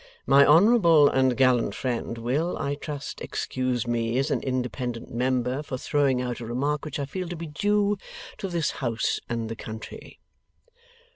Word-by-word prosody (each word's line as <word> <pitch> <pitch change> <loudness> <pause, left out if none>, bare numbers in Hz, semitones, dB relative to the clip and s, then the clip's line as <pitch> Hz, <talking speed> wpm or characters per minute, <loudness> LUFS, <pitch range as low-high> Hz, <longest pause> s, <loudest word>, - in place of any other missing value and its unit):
My 140 +1 +6
honourable 170 -3 +6
and 130 -2 +2
gallant 125 -6 +3
friend 120 -2 -3
will, 135 +10 -1
I 140 -1 -2
trust, 145 0 -6
excuse 130 -2 -2
me, 120 0 -1
as 135 - 0
an - - 0
independent 125 -2 -3
member, 125 +2 0
for 135 -3 -5
throwing 140 -1 +1
out 125 -1 -4
a 120 - -6
remark 140 +6 -1
which 150 - -4
I 140 - -2
feel 180 +5 -5
to 175 - -4
be 165 0 -6
due 205 +5 +1 0.4
to 195 - -3
this 170 -4 -1
house 115 -3 0
and 115 -1 -2
the 115 - -5
country. 110 0 -9
130 Hz, 165 wpm, -26 LUFS, 120-150 Hz, 0.4 s, My